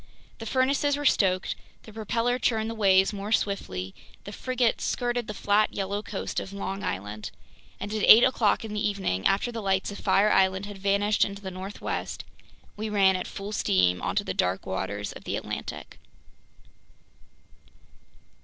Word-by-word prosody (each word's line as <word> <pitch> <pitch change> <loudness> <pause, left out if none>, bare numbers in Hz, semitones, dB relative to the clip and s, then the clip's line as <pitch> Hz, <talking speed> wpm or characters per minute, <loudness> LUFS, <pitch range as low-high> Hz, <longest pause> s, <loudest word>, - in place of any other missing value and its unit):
The 225 - -6
furnaces 275 +3 +2
were 290 - -4
stoked; 185 -7 +2 0.3
the 220 - -13
propeller 230 +3 -1
churned 225 -2 0
the - - -4
waves 195 -2 +4
more 200 +1 -5
swiftly; 95 - -1 0.3
the 205 - -8
frigate 250 +2 0
skirted 240 -2 -1
the 210 - -4
flat, 205 +2 +2
yellow 200 +1 -2
coast 205 -2 -4
of 190 - -7
Long 195 0 -4
Island; 105 +3 -4 0.5
and 205 - -5
at 215 - -1
eight 225 - +10
o'clock 230 -4 +2
in 215 - -6
the 210 - -2
evening, 190 - 0
after 205 +5 +1
the 230 -1 -5
lights 190 -1 0
of 200 - -8
Fire 210 +2 +3
Island 190 +1 +3
had 205 -1 -9
vanished 200 +2 +2
into 200 0 -4
the 190 - -5
northwest, 190 +2 -5 0.5
we 215 +1 -4
ran 195 -2 +4
at 185 - -3
full 200 +1 -7
steam 90 - +2
onto - - 0
the - - -3
dark 90 +1 0
waters 100 +2 -3
of - - -11
the - - -3
Atlantic. - - -6
200 Hz, 165 wpm, -27 LUFS, 190-220 Hz, 0.5 s, eight